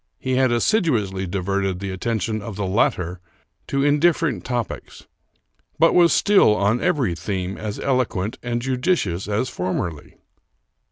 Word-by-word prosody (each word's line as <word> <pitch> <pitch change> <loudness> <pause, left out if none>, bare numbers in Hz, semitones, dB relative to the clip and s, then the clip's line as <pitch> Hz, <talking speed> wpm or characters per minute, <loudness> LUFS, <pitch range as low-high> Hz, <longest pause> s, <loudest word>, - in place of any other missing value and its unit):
He 130 - -3
had 130 -1 +3
assiduously 115 - +1
diverted 95 0 -1
the 100 0 -4
attention 110 +2 -2
of 100 0 -7
the 100 0 -2
latter 90 -2 0 0.5
to 140 0 0
indifferent 150 +1 +2
topics, 120 -4 -5 0.7
but 165 +2 +4
was 175 -1 +5
still, 195 - +4
on 105 +4 +1
every 145 - +1
theme, 95 +1 -4
as 105 -1 -5
eloquent 120 -6 -1
and 120 -1 -3
judicious 125 - 0
as 105 +5 0
formerly. 90 - -4
110 Hz, 130 wpm, -22 LUFS, 95-135 Hz, 0.7 s, was